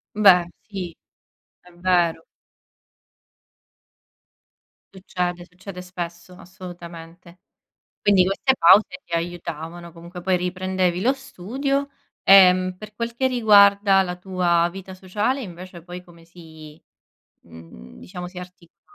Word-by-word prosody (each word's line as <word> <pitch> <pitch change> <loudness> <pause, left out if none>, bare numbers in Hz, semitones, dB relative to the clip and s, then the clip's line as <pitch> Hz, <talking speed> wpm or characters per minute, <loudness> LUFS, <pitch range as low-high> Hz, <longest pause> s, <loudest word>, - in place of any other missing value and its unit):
Beh, 190 -5 +6 0.2
sì, 185 -5 -6 0.7
è 180 - -20
vero. 175 -2 0 2.7
Succede, 180 -2 -4
succede 180 0 -11
spesso, 175 -1 -8
assolutamente. 175 -1 -12 0.6
Quindi 200 -3 +4
queste 200 +8 +1
pause 185 +1 +5
ti 170 - -6
aiutavano. 170 0 -5
Comunque 170 +2 -11
poi 185 +1 +1
riprendevi 185 0 -1
lo 255 +7 +2
studio, 275 +4 -3 0.4
ehm, 185 -1 +6
per 210 +1 -12
quel 235 0 -4
che 260 +2 +1
riguarda 200 -4 +5
la 180 -1 -5
tua 180 -2 +1
vita 190 0 -10
sociale 205 +8 -2
invece 180 -4 -10
poi 180 +1 -9
come 170 -2 -19
si 160 -3 -15 0.6
mhmm, 80 -7 -15
diciamo 180 - -8
si 180 0 -13
articola 180 -2 -13
180 Hz, 110 wpm, -22 LUFS, 170-195 Hz, 2.7 s, Beh